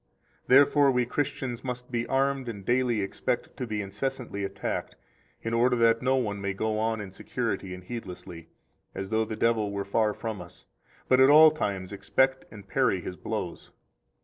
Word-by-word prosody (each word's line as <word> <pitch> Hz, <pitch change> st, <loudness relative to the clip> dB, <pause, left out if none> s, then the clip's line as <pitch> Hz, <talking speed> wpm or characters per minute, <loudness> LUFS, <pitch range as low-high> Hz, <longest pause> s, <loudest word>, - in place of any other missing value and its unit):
109 130 Hz, -, +7 dB
Therefore 145 Hz, -1 st, +3 dB
we 125 Hz, -2 st, +2 dB
Christians 125 Hz, -2 st, -3 dB
must 125 Hz, -1 st, -5 dB
be 120 Hz, -1 st, -1 dB
armed 135 Hz, -1 st, 0 dB
and 100 Hz, -4 st, -7 dB
daily 120 Hz, -3 st, +1 dB
expect 95 Hz, -, -3 dB
to 125 Hz, -, -4 dB
be 105 Hz, -2 st, -2 dB
incessantly 105 Hz, +1 st, -4 dB
attacked, 95 Hz, 0 st, -4 dB, 0.5 s
in 115 Hz, -, -2 dB
order 125 Hz, +2 st, +3 dB
that 115 Hz, -1 st, +3 dB
no 130 Hz, +1 st, +2 dB
one 105 Hz, -6 st, -1 dB
may 100 Hz, 0 st, -2 dB
go 110 Hz, +1 st, -1 dB
on 110 Hz, 0 st, 0 dB
in 100 Hz, -2 st, -7 dB
security 95 Hz, 0 st, -3 dB
and 90 Hz, 0 st, -8 dB
heedlessly, 90 Hz, -6 st, -8 dB, 0.5 s
as 95 Hz, 0 st, -5 dB
though 110 Hz, 0 st, +2 dB
the 110 Hz, -, -5 dB
devil 110 Hz, -2 st, +1 dB
were 100 Hz, 0 st, -3 dB
far 105 Hz, +1 st, +1 dB
from 110 Hz, -4 st, -5 dB
us, 90 Hz, +1 st, -14 dB, 0.4 s
but 130 Hz, -, +4 dB
at 130 Hz, +1 st, +7 dB
all 155 Hz, +1 st, +9 dB
times 100 Hz, -10 st, -3 dB
expect 130 Hz, +7 st, +1 dB
and 100 Hz, -2 st, -12 dB
parry 125 Hz, -7 st, +2 dB
his 90 Hz, -, -6 dB
blows. -, -, -5 dB
115 Hz, 180 wpm, -27 LUFS, 100-130 Hz, 0.5 s, all